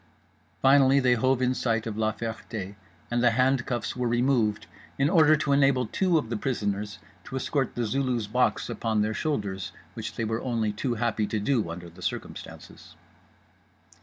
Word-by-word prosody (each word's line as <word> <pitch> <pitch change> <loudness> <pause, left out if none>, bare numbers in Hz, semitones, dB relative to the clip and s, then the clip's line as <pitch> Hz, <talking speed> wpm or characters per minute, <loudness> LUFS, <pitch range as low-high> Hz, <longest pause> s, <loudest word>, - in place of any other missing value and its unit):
Finally 135 0 +6
they 125 -2 +4
hove 130 +2 +2
in 125 0 +2
sight 115 -3 0
of 110 -2 -4
La 110 0 +1
Ferté 110 -3 -6 0.4
and 120 0 +1
the 120 - +5
handcuffs 125 -2 +1
were 125 -1 -1
removed 120 -3 +1 0.3
in 140 +3 +2
order 155 -4 +6
to 150 -2 -1
enable 135 -2 +4
two 175 - +1
of 120 -7 -2
the - - 0
prisoners 105 -4 -2 0.3
to 130 - -8
escort 130 0 -1
The 120 - -1
Zulu's 125 -1 0
box 105 - +1
upon 110 -2 0
their 110 +1 -1
shoulders, 100 -10 -2 0.2
which - - -6
they 115 - -2
were 110 +1 -2
only 115 -4 -1
too 120 +3 -2
happy 110 -2 0
to 110 - -1
do 110 -3 0
under 85 +1 -7
the 85 - -14
circumstances. - - -7
120 Hz, 170 wpm, -27 LUFS, 110-135 Hz, 0.4 s, Finally